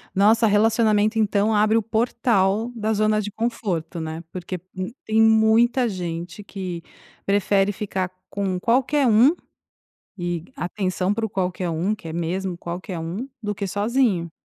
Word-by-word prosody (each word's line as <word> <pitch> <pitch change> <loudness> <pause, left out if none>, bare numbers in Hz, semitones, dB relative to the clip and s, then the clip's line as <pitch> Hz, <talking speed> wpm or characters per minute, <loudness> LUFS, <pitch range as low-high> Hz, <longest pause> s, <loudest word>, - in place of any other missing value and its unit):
Nossa, 220 +3 +4
relacionamento, 215 0 +3
então, 215 0 +2
abre 215 +2 +4
o - - +3
portal 225 -1 +1
da 220 -1 -1
zona 215 0 +2
de 210 0 -5
conforto, 195 -8 -3
né. 160 +1 -5
Porque 180 0 -5 0.2
um 185 0 -3 0.2
tem 220 +1 +3
muita 225 +3 +4
gente 175 0 -5
que 185 -4 -6 0.4
prefere 200 0 +2
ficar 190 -2 -3 0.2
com 190 -2 -2
qualquer 260 +5 +2
um, 235 +8 +6 0.8
e, 175 -2 -3
atenção 185 0 -1
para 225 +1 -1
o - - -8
qualquer 180 -1 -2
um, 170 +6 0
que 210 -6 -7
é 160 - -5
mesmo 175 +2 -2
qualquer 175 0 -6
um, 180 +11 -5
do 210 0 -2
que 200 0 -4
sozinho. 205 -4 +1
205 Hz, 150 wpm, -23 LUFS, 180-220 Hz, 0.8 s, um